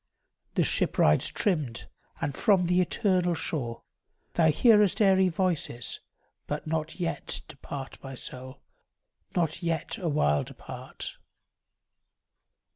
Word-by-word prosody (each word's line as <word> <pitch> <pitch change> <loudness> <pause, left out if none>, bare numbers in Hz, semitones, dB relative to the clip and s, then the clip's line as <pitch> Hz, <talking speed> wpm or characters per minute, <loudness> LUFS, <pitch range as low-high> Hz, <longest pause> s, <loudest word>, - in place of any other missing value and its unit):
The - - +4
ship - - +1
rides 75 - +5
trimmed, 150 - -1 0.3
and 145 - -1
from 190 +3 +3
the 180 +1 +3
eternal 180 -2 +1
shore 120 -8 -3 0.5
Thou 165 -2 +4
hearest 210 - +5
airy 190 -3 +5
voices; 165 - -1 0.5
but - - -3
not 160 +2 -3
yet 170 -2 -2
Depart, 135 -2 -8
my 135 -1 -7
soul, 130 +2 -7 0.7
not 165 -2 0
yet 165 -3 -2
awhile 145 - +2
depart. - - -7
165 Hz, 110 wpm, -28 LUFS, 135-185 Hz, 0.7 s, rides